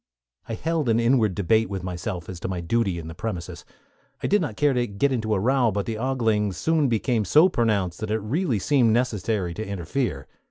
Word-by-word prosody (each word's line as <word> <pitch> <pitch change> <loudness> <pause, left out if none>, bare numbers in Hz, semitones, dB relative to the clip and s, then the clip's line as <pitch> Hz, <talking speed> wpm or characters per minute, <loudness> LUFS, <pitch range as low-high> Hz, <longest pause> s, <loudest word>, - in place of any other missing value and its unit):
I 115 - -2
held 160 0 -1
an 115 0 +3
inward 115 -5 +2
debate 110 +3 +2
with 95 -2 -4
myself 90 0 -5
as 90 -2 -7
to - - -4
my 95 -1 -3
duty 95 +1 0
in 80 -1 -7
the 80 - -7
premises. 90 -2 -5 0.6
I - - 0
did 205 0 +3
not 130 -11 -4
care 145 -2 +3
to 120 -1 0
get 105 +7 0
into 110 -4 0
a - - 0
row; 125 +3 +2
but 100 0 -2
the 110 -1 -4
ogling 110 -6 0
soon 155 - +1
became 115 0 +1
so 155 - +5
pronounced 105 - 0
that 110 -1 -4
it 110 - +1
really 120 - -1
seemed 120 +1 +3
necessary 110 -6 0
to 110 - -5
interfere. 100 - -3
110 Hz, 210 wpm, -24 LUFS, 95-125 Hz, 0.6 s, so